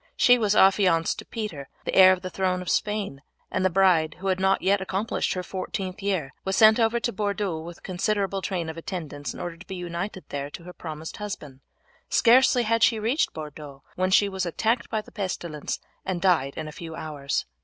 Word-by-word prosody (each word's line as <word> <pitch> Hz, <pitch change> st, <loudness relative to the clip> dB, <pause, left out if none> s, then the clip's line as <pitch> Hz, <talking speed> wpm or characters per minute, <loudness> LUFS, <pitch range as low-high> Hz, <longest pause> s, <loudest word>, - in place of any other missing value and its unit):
She 245 Hz, 0 st, +6 dB
was 210 Hz, -2 st, +2 dB
affianced 190 Hz, -5 st, +4 dB
to -, -, -8 dB
Peter, 190 Hz, -, -5 dB, 0.2 s
the -, -, -2 dB
heir 185 Hz, 0 st, +8 dB
to 180 Hz, -, -14 dB
the 185 Hz, -, -6 dB
throne 185 Hz, -1 st, 0 dB
of 180 Hz, -, -2 dB
Spain; 205 Hz, -10 st, -1 dB, 0.3 s
and -, -, 0 dB
the 185 Hz, -, +4 dB
bride, 180 Hz, -4 st, +3 dB
who 195 Hz, +2 st, -3 dB
had 185 Hz, 0 st, +1 dB
not 190 Hz, +1 st, +2 dB
yet 195 Hz, +1 st, +3 dB
accomplished 195 Hz, +3 st, -1 dB
her 185 Hz, -, -3 dB
fourteenth 185 Hz, +1 st, -5 dB
year, 185 Hz, -9 st, -1 dB
was 190 Hz, 0 st, -1 dB
sent 220 Hz, +2 st, +7 dB
over 230 Hz, +1 st, +2 dB
to 235 Hz, -, -2 dB
Bordeaux 200 Hz, -4 st, -1 dB
with 170 Hz, +1 st, -10 dB
considerable 195 Hz, +1 st, -1 dB
train 180 Hz, -4 st, -2 dB
of 160 Hz, 0 st, -6 dB
attendants 155 Hz, -6 st, -5 dB
in -, -, -9 dB
order 170 Hz, -1 st, -5 dB
to 175 Hz, -, -14 dB
be 190 Hz, -, -5 dB
united 180 Hz, +2 st, -5 dB
there 140 Hz, 0 st, -4 dB
to 170 Hz, -, -10 dB
her 180 Hz, +1 st, -10 dB
promised 160 Hz, -2 st, -7 dB
husband. 150 Hz, -10 st, -7 dB, 0.5 s
Scarcely 250 Hz, +1 st, +5 dB
had 230 Hz, 0 st, +1 dB
she 225 Hz, 0 st, +5 dB
reached 230 Hz, +8 st, +1 dB
Bordeaux 150 Hz, -3 st, -9 dB
when 185 Hz, +1 st, +1 dB
she 200 Hz, +2 st, +5 dB
was 190 Hz, -1 st, -3 dB
attacked 225 Hz, +8 st, 0 dB
by 220 Hz, -1 st, -1 dB
the -, -, -17 dB
pestilence 175 Hz, -6 st, -4 dB, 0.2 s
and 185 Hz, -2 st, -2 dB
died 170 Hz, -7 st, +2 dB
in 155 Hz, -, -4 dB
a -, -, -6 dB
few 160 Hz, +1 st, -8 dB
hours. 145 Hz, -4 st, -3 dB
185 Hz, 210 wpm, -26 LUFS, 165-205 Hz, 0.5 s, heir